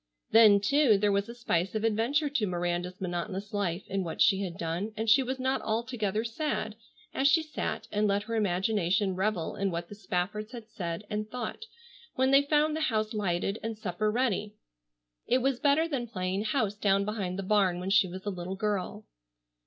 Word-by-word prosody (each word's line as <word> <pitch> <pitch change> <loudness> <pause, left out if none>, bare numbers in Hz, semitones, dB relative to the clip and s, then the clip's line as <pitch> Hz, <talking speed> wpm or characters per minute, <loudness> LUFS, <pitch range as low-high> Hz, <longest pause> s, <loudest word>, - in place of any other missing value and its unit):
Then, 215 -3 +7
too, 230 +1 +4
there 205 +1 +2
was 200 +2 0
a 235 - -7
spice 195 -5 -1
of 215 - -1
adventure 230 +8 +1
to 275 -7 0
Miranda's 175 0 -2
monotonous 185 +3 -4
life 195 -3 -1
in 195 0 -2
what 165 - -6
she 195 0 +4
had 180 -4 -4
done, 175 +6 -3
and 220 +1 -2
she 225 +5 +6
was 260 +1 -3
not 260 +1 0
altogether 220 -2 -1
sad 230 -2 -2 0.4
as 270 - +2
she 315 +3 +4
sat 310 -1 -4
and 210 0 +1
let 200 0 +1
her 230 +2 -6
imagination 195 -1 +1
revel 190 -3 -1
in 200 0 0
what 170 -1 -4
the - - -8
Spaffords 210 +2 -3
had 230 -3 -8
said 170 -4 -5
and 210 0 -3
thought, 250 - -5 0.5
when 260 +1 +2
they 275 +1 +7
found 300 +2 +2
the 315 - -2
house 215 -7 0
lighted 195 0 -1
and 225 -1 -4
supper 210 +1 -1
ready. 210 -3 -1 0.7
It 250 - +4
was 270 -2 +1
better 300 +2 +3
than 265 -7 -3
playing 190 -1 -2
house 215 -3 0
down 200 -1 +1
behind 200 -4 -3
the 195 - -3
barn 190 -3 +2
when 185 +2 -3
she 195 -1 +5
was 185 +2 -8
a 205 - -1
little 185 0 -5
girl. 195 - -2
210 Hz, 195 wpm, -29 LUFS, 190-235 Hz, 0.7 s, Then